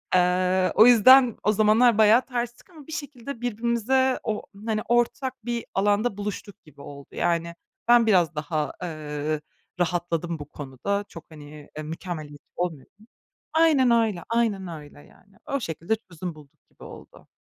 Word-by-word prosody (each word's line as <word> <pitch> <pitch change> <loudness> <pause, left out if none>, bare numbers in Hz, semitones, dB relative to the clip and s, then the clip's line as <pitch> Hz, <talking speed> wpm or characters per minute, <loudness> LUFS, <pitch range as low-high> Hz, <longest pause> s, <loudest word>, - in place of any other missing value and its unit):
Eee, 185 0 +2
o 220 - +8
yüzden 245 +1 +7
o 210 - +3
zamanlar 215 +2 +4
bayağı 220 +3 +6
terstik 240 +3 -5
ama 315 -5 -15
bir - - -10
şekilde 280 -5 -7
birbirimize 240 +3 0
o, 215 -2 -3 0.2
hani, 215 -1 -1
ortak 240 0 0
bir 235 -1 -3
alanda 205 +2 +1
buluştuk 205 0 -6
gibi 145 -2 -17
oldu. 140 -1 -11
Yani, 170 -1 -1 0.3
ben 240 -1 +6
biraz 175 -6 +3
daha, 150 -1 -2
eee, 155 -2 -4 0.4
rahatladım 170 -2 -1
bu 145 - -7
konuda. 145 +9 -4
Çok, 165 - -12
hani, 150 -1 -12
mükemmeliyet 155 -3 -7
olmuyordum. 180 - -6 0.5
Aynen 310 -6 +4
öyle, 225 -6 +1
aynen 220 -5 0
öyle 150 -3 -10
yani. 195 +6 -21
O 280 - -2
şekilde 170 +1 -2
çözüm 180 -5 -8
bulduk 145 -2 -18
gibi - - -18
oldu. - - -13
200 Hz, 145 wpm, -25 LUFS, 165-235 Hz, 0.5 s, o